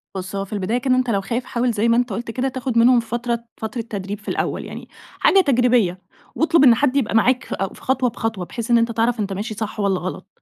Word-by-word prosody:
بُص، 190 Hz, +1 st, -5 dB
هوّ 195 Hz, 0 st, -2 dB
في 200 Hz, -, -10 dB
البداية 205 Hz, +3 st, -1 dB
كده 255 Hz, 0 st, +1 dB
أنتَ 255 Hz, -1 st, 0 dB
لو 200 Hz, -3 st, +1 dB
خايف، 235 Hz, +5 st, -3 dB
حاول 245 Hz, 0 st, 0 dB
زي 225 Hz, 0 st, 0 dB
ما 230 Hz, -, +4 dB
أنتَ 245 Hz, 0 st, +1 dB
قُلت 230 Hz, +3 st, -4 dB
كده 255 Hz, +3 st, -1 dB
تاخد 260 Hz, -2 st, -3 dB
منهم 240 Hz, +1 st, +6 dB
فترة 235 Hz, 0 st, -3 dB
فترة 220 Hz, +2 st, -4 dB
تدريب 205 Hz, -2 st, -6 dB
في 210 Hz, -, -21 dB
الأوّل -, -, -2 dB
يعني، -, -, -9 dB, 0.3 s
حاجة 390 Hz, -, +5 dB
تجريبية. 245 Hz, -, +2 dB, 0.4 s
واطلُب 325 Hz, -1 st, +3 dB
إن 245 Hz, -4 st, +7 dB
حد 265 Hz, +2 st, +1 dB
يبقى 245 Hz, -6 st, 0 dB
معاك 245 Hz, +4 st, +3 dB
فأو 195 Hz, 0 st, -3 dB
في -, -, -15 dB
خطوة 260 Hz, -1 st, +1 dB
بخطوة، 220 Hz, -5 st, -3 dB
بحيث 235 Hz, +5 st, -5 dB
إن 235 Hz, -, +6 dB
أنتَ 230 Hz, 0 st, +1 dB
تعرف 230 Hz, +1 st, 0 dB
أنتَ 200 Hz, -2 st, -2 dB
ماشي 210 Hz, +4 st, -4 dB
صح 215 Hz, 0 st, -5 dB
والّا 195 Hz, -2 st, +1 dB
غلط. 185 Hz, +1 st, -6 dB
230 Hz, 240 wpm, -21 LUFS, 205-250 Hz, 0.4 s, إن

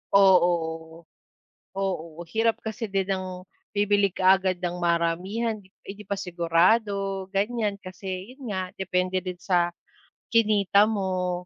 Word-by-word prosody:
Oo. 170 Hz, -4 st, +3 dB, 0.7 s
Oo, 170 Hz, -4 st, -3 dB
hirap 225 Hz, 0 st, +2 dB
kasi 220 Hz, 0 st, -5 dB
din 195 Hz, -1 st, 0 dB
ng 185 Hz, -1 st, -5 dB, 0.2 s
bibili 205 Hz, -1 st, +2 dB
kaagad 185 Hz, 0 st, +3 dB
ng 175 Hz, 0 st, -3 dB
maramihan, 175 Hz, +7 st, 0 dB
di 190 Hz, -, -22 dB, 0.2 s
'di 200 Hz, +2 st, -8 dB
pa 200 Hz, -, -3 dB
sigurado, 195 Hz, +3 st, +1 dB
ganyan. 210 Hz, 0 st, 0 dB
Kasi 185 Hz, +1 st, -7 dB
'yon 265 Hz, -4 st, -9 dB
nga, 185 Hz, -2 st, -3 dB
depende 185 Hz, -1 st, 0 dB
din 180 Hz, -1 st, -5 dB
sa 175 Hz, 0 st, +1 dB, 0.6 s
kinita 210 Hz, -3 st, +4 dB
mo, 185 Hz, -4 st, -1 dB
190 Hz, 120 wpm, -26 LUFS, 180-205 Hz, 0.7 s, kinita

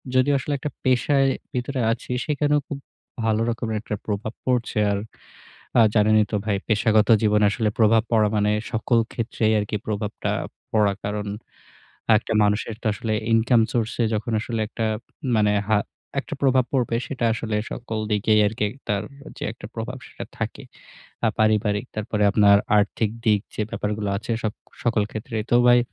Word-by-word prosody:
যদি 130 Hz, +2 st, +4 dB
আসলে 145 Hz, +2 st, -3 dB
একটা 145 Hz, +2 st, -4 dB
পেশায় 135 Hz, +2 st, +3 dB, 0.2 s
ভিতরে 125 Hz, +2 st, -2 dB
আছি, 120 Hz, +2 st, -4 dB
সেখানেও 150 Hz, 0 st, +2 dB
খুব 140 Hz, -, -3 dB, 0.5 s
ভালো 110 Hz, 0 st, +2 dB
রকমের 115 Hz, -2 st, -2 dB
একটা 105 Hz, -, -4 dB
প্রভাব 105 Hz, +1 st, -3 dB
পড়ছে। 125 Hz, -3 st, 0 dB
আর 100 Hz, -, 0 dB, 0.8 s
আ -, -, +8 dB
জানেনই 105 Hz, 0 st, +4 dB
তো -, -, 0 dB
ভাই, 100 Hz, -2 st, +1 dB
পেশাগত 110 Hz, 0 st, +3 dB, 0.2 s
জীবনে 105 Hz, 0 st, +4 dB
আসলে 105 Hz, +1 st, 0 dB
প্রভাব 110 Hz, 0 st, +5 dB
পড়া 110 Hz, -2 st, +4 dB
মানে 105 Hz, 0 st, +2 dB, 0.2 s
সকল 115 Hz, +1 st, +2 dB
ক্ষেত্রেই 110 Hz, -2 st, 0 dB
আর 105 Hz, -, -1 dB
কি -, -, 0 dB
প্রভাবটা 105 Hz, -1 st, -3 dB, 0.4 s
পড়া, 105 Hz, -2 st, +3 dB
কারণ 105 Hz, 0 st, -3 dB, 0.9 s
১ -, -, +2 dB
টা -, -, 0 dB
মানুষের 105 Hz, +2 st, 0 dB
তো -, -, -5 dB
আসলে 110 Hz, +2 st, -3 dB, 0.2 s
income 115 Hz, 0 st, +4 dB
source 115 Hz, -2 st, -1 dB
এ -, -, +3 dB
যখন 110 Hz, +2 st, -2 dB
আসলে 115 Hz, -1 st, -3 dB
একটা 115 Hz, 0 st, -3 dB, 0.5 s
মানে 105 Hz, -1 st, +3 dB, 0.2 s
হা 110 Hz, -1 st, +4 dB, 0.4 s
একটা -, -, -7 dB
প্রভাব 130 Hz, -2 st, +4 dB
পড়বে, 120 Hz, -3 st, +1 dB
সেটা 130 Hz, -4 st, -3 dB
আসলে 110 Hz, -2 st, -2 dB, 0.2 s
সকল 110 Hz, -2 st, -5 dB
দিকেই 105 Hz, +1 st, +3 dB
আর 105 Hz, -, -1 dB
কি 105 Hz, -, +1 dB
একটা 130 Hz, -6 st, -3 dB, 0.4 s
যে -, -, -11 dB
একটা -, -, -10 dB
প্রভাব 120 Hz, +3 st, -5 dB
সেটা -, -, -8 dB
থাকে, -, -, -4 dB, 0.6 s
আর 110 Hz, -, +4 dB
পারিবারিক, 105 Hz, -1 st, +2 dB
তারপরে 105 Hz, 0 st, -1 dB
আপনার 100 Hz, -1 st, +6 dB, 0.2 s
আর্থিক 105 Hz, +1 st, +1 dB
দিক, 105 Hz, -2 st, +4 dB
যে 110 Hz, -, -1 dB
ব্যাপারগুলো 105 Hz, 0 st, -2 dB
আছে। 115 Hz, +2 st, -4 dB
সক 110 Hz, -1 st, -1 dB, 0.3 s
সকল 115 Hz, -3 st, +2 dB
ক্ষেত্রেই 110 Hz, 0 st, -4 dB
তো -, -, +7 dB
ভাই, 120 Hz, 0 st, +7 dB
110 Hz, 170 wpm, -23 LUFS, 105-120 Hz, 0.9 s, আ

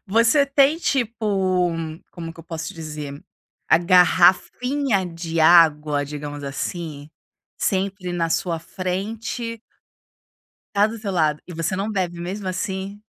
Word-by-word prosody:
Você 230 Hz, +8 st, +4 dB
tem, 275 Hz, +2 st, +4 dB
tipo, 205 Hz, -, 0 dB, 0.4 s
como 165 Hz, -2 st, -7 dB
que 165 Hz, -, -12 dB
eu -, -, -16 dB
posso 165 Hz, -1 st, -6 dB
dizer, 150 Hz, -3 st, -7 dB, 0.5 s
a -, -, +6 dB
garrafinha 190 Hz, +7 st, +3 dB
de 165 Hz, -1 st, -3 dB
água, 155 Hz, -3 st, +5 dB
digamos, 145 Hz, 0 st, -6 dB
assim, 145 Hz, +1 st, -5 dB, 0.5 s
sempre 190 Hz, -1 st, -1 dB
na 170 Hz, -1 st, 0 dB
sua 170 Hz, -1 st, 0 dB
frente? 215 Hz, +7 st, -4 dB, 1.2 s
Tá 205 Hz, +1 st, +5 dB
do 225 Hz, +1 st, -6 dB
seu 210 Hz, -2 st, -4 dB
lado? 155 Hz, -5 st, +1 dB
E -, -, -7 dB
você 165 Hz, +2 st, -2 dB
não 200 Hz, +3 st, -2 dB
bebe 180 Hz, -4 st, -2 dB
mesmo 190 Hz, +3 st, -5 dB
assim? 190 Hz, +2 st, -4 dB
180 Hz, 130 wpm, -22 LUFS, 165-205 Hz, 1.2 s, a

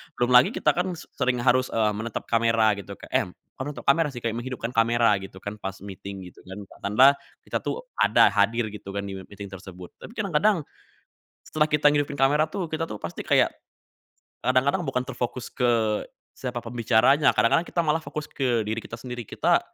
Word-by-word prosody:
Belum 120 Hz, 0 st, 0 dB
lagi 125 Hz, +1 st, +6 dB
kita, 150 Hz, -, +3 dB
kan 180 Hz, +3 st, -2 dB
s 170 Hz, -, -10 dB, 0.2 s
sering 125 Hz, 0 st, +2 dB
harus, 130 Hz, 0 st, +3 dB
eee, 110 Hz, -2 st, +1 dB
menatap 110 Hz, +2 st, -4 dB
kamera 115 Hz, -1 st, +3 dB
gitu 100 Hz, -, -8 dB
kek -, -, -14 dB
eh, -, -, +2 dB, 0.3 s
kok 130 Hz, -, -4 dB
natap 145 Hz, 0 st, -7 dB
kamera 160 Hz, +2 st, +4 dB
sih, 120 Hz, -, -7 dB
kayak 115 Hz, 0 st, -1 dB
menghidupkan 120 Hz, -1 st, -4 dB
kamera, 115 Hz, -2 st, +3 dB
gitu, 95 Hz, -1 st, -11 dB
kan, 100 Hz, +1 st, -5 dB
pas 95 Hz, -2 st, -5 dB
meeting, 100 Hz, 0 st, -8 dB
gitu, -, -, -20 dB
kan, 95 Hz, +1 st, -9 dB, 0.2 s
ditambah 110 Hz, +7 st, +5 dB, 0.4 s
kita -, -, -1 dB
tuh -, -, -3 dB, 0.2 s
ada -, -, +5 dB
hadir, 115 Hz, -1 st, +1 dB
gitu, 105 Hz, -1 st, -9 dB
kan, 100 Hz, -, -2 dB
di 95 Hz, -1 st, -6 dB
meeting 100 Hz, 0 st, -9 dB
tersebut, 90 Hz, -2 st, -10 dB
tapi -, -, -11 dB
kadang-kadang, 200 Hz, -1 st, +2 dB, 0.8 s
setelah 155 Hz, -1 st, +1 dB
kita 150 Hz, 0 st, +4 dB
ngidupin 145 Hz, -1 st, 0 dB
kamera 145 Hz, +3 st, +4 dB
tuh, 175 Hz, +3 st, -4 dB
kita 160 Hz, +1 st, -2 dB
tuh 105 Hz, -, -7 dB
pasti 85 Hz, -, -5 dB
kayak, -, -, +4 dB, 0.9 s
kadang-kadang 130 Hz, +8 st, +2 dB
bukan 125 Hz, -1 st, -1 dB
terfokus 125 Hz, -1 st, -4 dB
ke 120 Hz, -2 st, +2 dB, 0.5 s
siapa 125 Hz, -2 st, -5 dB
pembicaranya, 120 Hz, +4 st, +3 dB
kadang-kadang 165 Hz, +9 st, +3 dB
kita -, -, -3 dB
malah 155 Hz, 0 st, +1 dB
fokus 150 Hz, +1 st, -6 dB
ke 125 Hz, -4 st, 0 dB
diri 110 Hz, +1 st, -3 dB
kita 115 Hz, -, -13 dB
sendiri. 125 Hz, -2 st, -6 dB
Kita -, -, +2 dB
120 Hz, 190 wpm, -25 LUFS, 110-145 Hz, 0.9 s, lagi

